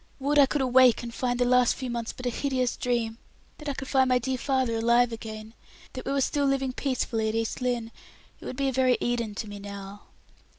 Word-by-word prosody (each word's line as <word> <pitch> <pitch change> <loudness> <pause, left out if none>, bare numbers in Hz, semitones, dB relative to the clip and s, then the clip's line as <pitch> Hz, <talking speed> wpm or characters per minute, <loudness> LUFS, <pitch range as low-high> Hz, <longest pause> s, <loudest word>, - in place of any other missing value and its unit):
Would 290 +2 +2
I 280 - +7
could 290 +1 -1
awake 255 -2 +5
and 235 -1 -6
find 245 0 -1
the 245 - +2
last 250 -1 +4
few 255 -2 -5
months 235 -1 -3
but 255 - -10
a 245 - +1
hideous 255 -1 -1
dream! 235 -2 -1 0.4
that 300 -1 -5
I 280 - -2
could 270 - -6
find 265 -1 +3
my 255 - +4
dear 260 +2 -1
father 260 -2 0
alive 235 +1 +3
again! 220 -1 -8 0.4
that 255 - -7
we - - 0
were 275 0 +1
still 285 +1 +1
living 270 -1 0
peacefully 240 -5 -1
at 220 - -3
East 225 +2 -2
Lynne. 240 -2 -1 0.5
It - - -12
would 255 - -6
be 275 0 0
a - - +1
very 255 -1 +3
Eden 235 -3 -1
to 220 - -4
me 205 0 -8
now." 200 0 -8
245 Hz, 230 wpm, -27 LUFS, 230-265 Hz, 0.5 s, I